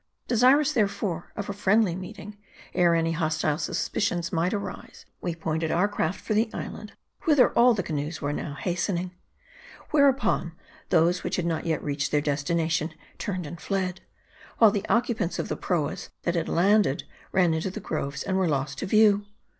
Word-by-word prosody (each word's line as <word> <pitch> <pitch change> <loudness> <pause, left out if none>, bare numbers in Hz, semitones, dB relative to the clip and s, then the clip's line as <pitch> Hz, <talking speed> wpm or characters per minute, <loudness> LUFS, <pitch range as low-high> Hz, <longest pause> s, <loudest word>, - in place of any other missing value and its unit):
Desirous, 265 +5 +4
therefore, 200 - -1
of 205 - -4
a 200 - -3
friendly 205 -1 +2
meeting, 190 +3 -8 0.4
ere 175 -1 +4
any 165 0 +1
hostile 155 -2 0
suspicions 175 -1 -1
might 170 +2 +1
arise, 205 -2 -6 0.2
we 175 -2 -2
pointed 160 0 -2
our 180 +5 +2
craft 190 -3 -2
for 215 - -3
the 220 +2 +2
island, - - -7 0.3
whither 290 -5 +5
all 240 0 +5
the 190 - -1
canoes 155 0 -3
were 145 +1 -2
now 145 -1 -4
hastening. 180 +3 -2 0.8
"Whereupon, 275 - +3 0.4
those 170 +2 +3
which - - -1
had 180 - -1
not 165 0 -2
yet 160 -2 -1
reached 145 -1 -1
their 150 - +3
destination, 155 +2 -1 0.2
turned 185 -4 -3
and 165 +3 -8
fled; 190 -2 -2 0.6
while 220 -3 +7
the 205 -1 -3
occupants 230 -6 +1
of - - -3
the - - -1
proas 165 -6 -2
that 170 - 0
had 165 -2 -1
landed, 195 -4 +3 0.3
ran 180 -3 +3
into 160 +4 -1
the 190 - -6
groves, 150 -7 -3
and 190 - -1
were 190 -2 +2
lost 140 -1 -2
to - - -3
view. 205 0 +4
180 Hz, 170 wpm, -26 LUFS, 160-205 Hz, 0.8 s, while